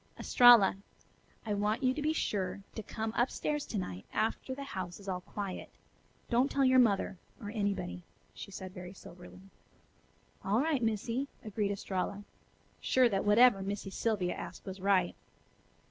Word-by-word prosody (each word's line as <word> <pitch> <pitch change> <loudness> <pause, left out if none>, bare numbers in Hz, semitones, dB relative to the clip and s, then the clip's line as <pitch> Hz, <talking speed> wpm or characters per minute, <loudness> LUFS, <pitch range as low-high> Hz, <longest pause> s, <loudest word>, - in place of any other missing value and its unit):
"Estralla, 240 -6 +7 0.7
I 210 - -1
want 210 +5 0
you 255 0 +3
to 300 - -4
be 305 +1 +1
sure 200 - -2
to 220 - -5
come 220 +1 -4
up 240 +2 +2
stairs 295 -1 -2
to 220 - -3
night 95 - -4
after 225 +4 -1
the 280 - -6
house 185 -9 -6
is 200 - -13
all 180 -1 -2
quiet. 195 0 -6 0.6
Don't 250 +3 +2
tell 275 -1 +2
your 260 0 +6
mother, 200 -5 +2 0.2
or 205 -2 -6
anybody," 200 - -2 0.3
she - - -9
said 190 -1 -8
very 180 0 -8
soberly. 180 0 -13 1.0
"All 205 +4 +2
right, 295 -2 +1
Missy," 230 +4 -1 0.2
agreed 210 -1 -1
Estralla, 200 0 -3 0.6
sure 255 -2 +3
that 195 -2 -1
whatever 210 0 +6
Missy 195 0 -4
Sylvia 195 -5 0
asked 170 +1 -8
was 190 0 -7
right. 190 -2 +2
205 Hz, 160 wpm, -32 LUFS, 190-240 Hz, 1.0 s, Estralla